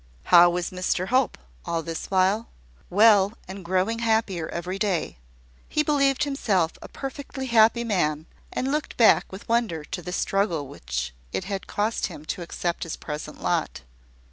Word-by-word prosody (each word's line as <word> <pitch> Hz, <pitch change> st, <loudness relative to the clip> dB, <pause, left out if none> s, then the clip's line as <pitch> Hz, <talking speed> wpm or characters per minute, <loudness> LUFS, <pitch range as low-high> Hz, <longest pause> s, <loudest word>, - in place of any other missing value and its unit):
How 175 Hz, 0 st, +9 dB
was 175 Hz, 0 st, -2 dB
Mr 185 Hz, 0 st, -1 dB
Hope, 255 Hz, +1 st, +2 dB, 0.3 s
all 170 Hz, -1 st, -2 dB
this 165 Hz, 0 st, -5 dB
while? 195 Hz, +4 st, +2 dB, 0.4 s
Well, 205 Hz, 0 st, +5 dB
and 190 Hz, +1 st, -8 dB
growing 190 Hz, +6 st, 0 dB
happier 220 Hz, -7 st, 0 dB
every 180 Hz, +3 st, -4 dB
day. 190 Hz, -, -1 dB, 0.5 s
He 300 Hz, -, +1 dB
believed 275 Hz, -2 st, +2 dB
himself 210 Hz, -, +1 dB
a -, -, -8 dB
perfectly 270 Hz, 0 st, -6 dB
happy 235 Hz, -1 st, +4 dB
man, 155 Hz, -9 st, 0 dB, 0.3 s
and 265 Hz, +1 st, -1 dB
looked 300 Hz, +1 st, -2 dB
back 230 Hz, -, +5 dB
with 190 Hz, +1 st, -10 dB
wonder 230 Hz, -9 st, 0 dB
to 180 Hz, +4 st, -6 dB
the 180 Hz, -, -6 dB
struggle 180 Hz, -6 st, 0 dB
which -, -, -4 dB, 0.2 s
it -, -, -2 dB
had 195 Hz, 0 st, -5 dB
cost 215 Hz, +2 st, -1 dB
him 150 Hz, -, -10 dB
to -, -, -9 dB
accept 170 Hz, 0 st, -3 dB
his 165 Hz, -, -3 dB
present 150 Hz, 0 st, -7 dB
lot. -, -, -1 dB
190 Hz, 160 wpm, -25 LUFS, 170-230 Hz, 0.5 s, How